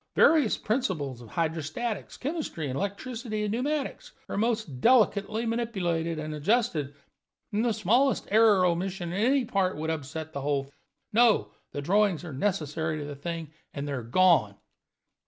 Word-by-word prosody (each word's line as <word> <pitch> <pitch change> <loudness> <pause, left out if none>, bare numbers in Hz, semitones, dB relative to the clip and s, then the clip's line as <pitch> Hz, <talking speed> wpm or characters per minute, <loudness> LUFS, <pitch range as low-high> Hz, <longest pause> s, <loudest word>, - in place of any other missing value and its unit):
Various 300 -9 +5
principles 170 - -2
of 115 - -12
hydrostatics, 165 - -3
chemistry, 285 - -3
electricity, 215 - -3
and 210 - -1
pneumatics 275 +5 -2
are - - -4
most 215 - -1
delicately 220 -2 +3
manipulated 180 -9 -1
and 155 0 -4
adjusted, 155 - 0 0.6
and 210 +2 +1
the 240 - +2
smallest 225 +5 +2
error 215 -2 +6
or - - +4
omission 175 0 -1
in 200 +3 0
any 265 +1 +3
part 190 -5 0
would 160 +1 -2
upset 160 +1 -5
the 140 - -4
whole. 140 -1 -1 0.4
No, 230 0 +4 0.2
the 145 - -5
drawings 195 0 +2
are 165 -5 -7
necessary 155 -1 -1
to 150 - -5
the 145 0 -6
thing, 165 +1 -5 0.2
and 140 0 -4
they - - -3
are 135 -3 -2
gone." 120 - +3
185 Hz, 155 wpm, -28 LUFS, 155-225 Hz, 0.6 s, error